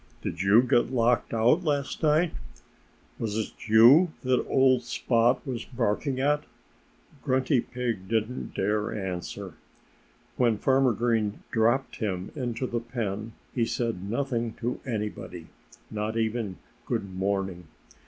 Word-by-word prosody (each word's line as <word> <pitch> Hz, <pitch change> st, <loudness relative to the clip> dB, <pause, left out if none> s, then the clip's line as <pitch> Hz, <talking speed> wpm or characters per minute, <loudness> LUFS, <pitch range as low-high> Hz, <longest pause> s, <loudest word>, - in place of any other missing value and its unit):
"Did 85 Hz, -, -3 dB
you 105 Hz, +5 st, +6 dB
get 125 Hz, -1 st, +2 dB
locked 120 Hz, -1 st, +2 dB
out 120 Hz, +10 st, +3 dB
last 145 Hz, -3 st, -1 dB
night? 155 Hz, +2 st, +3 dB, 0.9 s
Was 110 Hz, -2 st, -2 dB
it 110 Hz, -, -3 dB
you 125 Hz, +11 st, +7 dB
that 130 Hz, -1 st, +2 dB
old 130 Hz, -2 st, +4 dB
Spot 120 Hz, +1 st, +1 dB
was 125 Hz, -4 st, -4 dB
barking 125 Hz, +3 st, -1 dB
at?" 145 Hz, +2 st, +2 dB, 0.8 s
Grunty 130 Hz, 0 st, +2 dB
Pig 120 Hz, -7 st, -4 dB
didn't 110 Hz, +3 st, -2 dB
dare 105 Hz, +2 st, 0 dB
answer. 95 Hz, -3 st, -5 dB, 0.8 s
When 120 Hz, -4 st, +3 dB
Farmer 130 Hz, +1 st, +3 dB
Green 110 Hz, -2 st, 0 dB
dropped 120 Hz, +4 st, +1 dB
him 95 Hz, -4 st, -3 dB
into 125 Hz, -2 st, -2 dB
the 120 Hz, -1 st, -2 dB
pen 115 Hz, -2 st, -4 dB, 0.2 s
he 120 Hz, -, +1 dB
said 115 Hz, -4 st, -1 dB
nothing 120 Hz, -2 st, -1 dB
to 125 Hz, +1 st, -3 dB
anybody 105 Hz, -7 st, -5 dB, 0.4 s
not 110 Hz, +1 st, -2 dB
even 110 Hz, -4 st, -1 dB, 0.3 s
"Good 95 Hz, -2 st, -2 dB
morning!" 95 Hz, -2 st, -2 dB
115 Hz, 125 wpm, -27 LUFS, 105-130 Hz, 0.9 s, you